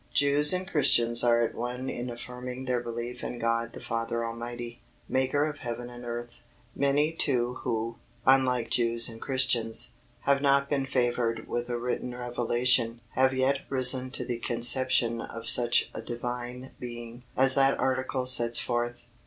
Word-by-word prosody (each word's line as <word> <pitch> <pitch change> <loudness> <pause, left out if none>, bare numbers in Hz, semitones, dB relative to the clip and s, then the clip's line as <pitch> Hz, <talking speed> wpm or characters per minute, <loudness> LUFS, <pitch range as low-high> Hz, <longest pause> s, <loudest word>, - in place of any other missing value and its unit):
Jews 145 +1 +6
and 185 0 0
Christians 120 -8 +4
are 120 -1 +4
at 115 - -2
one 125 +2 -5
in 125 0 -4
affirming 125 +2 -7
their 125 -1 0
belief 120 +1 -6
in 125 - -5
God 115 0 -1
the - - -8
Father 115 0 -3
Almighty, 120 +1 -6 0.3
Maker 130 +3 +1
of 150 -1 -6
heaven 120 0 -6
and 120 0 -10
earth. 120 0 -7 0.3
Many 145 +2 +2
too 125 -6 0
who, 115 -1 -3 0.3
unlike 130 -3 +3
Jews 115 -1 +2
and 115 -1 -10
Christians, 125 -4 +1 0.3
have 140 0 +2
not 140 0 +2
been 135 -2 0
favoured 120 -3 -1
with 120 +1 -3
a 120 - -1
written 125 +1 -3
revelation, 120 -1 +1
have 130 +1 +3
yet 135 +1 +1
risen 130 -1 +3
to - - -2
the 120 -2 -3
conception 120 0 +2
of 115 0 -8
such 120 -1 +3
a - - -6
Divine 125 +1 -6
Being 120 0 -8 0.2
as 130 0 +5
that 135 0 +3
article 130 0 -1
sets 120 -2 +4
forth. 120 0 -2
125 Hz, 160 wpm, -28 LUFS, 120-130 Hz, 0.3 s, Jews